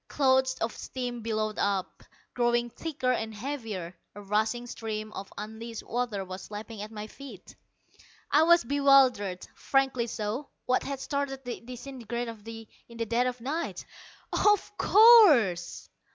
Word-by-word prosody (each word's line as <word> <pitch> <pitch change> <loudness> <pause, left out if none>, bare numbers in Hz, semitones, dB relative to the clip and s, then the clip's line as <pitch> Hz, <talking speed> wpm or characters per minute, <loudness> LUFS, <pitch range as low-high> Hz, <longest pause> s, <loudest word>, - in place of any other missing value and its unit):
Clouds 260 -1 +2
of 225 0 -3
steam 245 -2 -5
billowed 215 -1 -2
out, 200 -2 -1 0.3
growing 240 -1 +1
thicker 285 -5 -2
and 220 -3 -2
heavier. 210 -8 -5 0.2
A 205 - -8
rushing 220 +4 0
stream 215 -2 -5
of 195 - -8
unleashed 220 +2 -7
water 235 -5 -2
was 185 +1 -8
lapping 210 0 -7
at 210 - -6
my 210 -1 -7
feet. 225 -3 -12 0.8
I 295 - +5
was 340 +1 +5
bewildered, 260 -8 +3
frankly 265 -3 0
so. 225 +5 -4 0.2
What 255 0 +2
had 275 -1 -5
started 270 -1 -3
the 245 - -5
disintegrator 245 -1 -6 0.6
in 235 - -12
the 230 - -1
dead 235 +3 +1
of 250 -1 -4
night? 310 +7 -3 0.5
"Of 415 0 +2
course!" 330 - +6
240 Hz, 140 wpm, -28 LUFS, 215-270 Hz, 0.8 s, course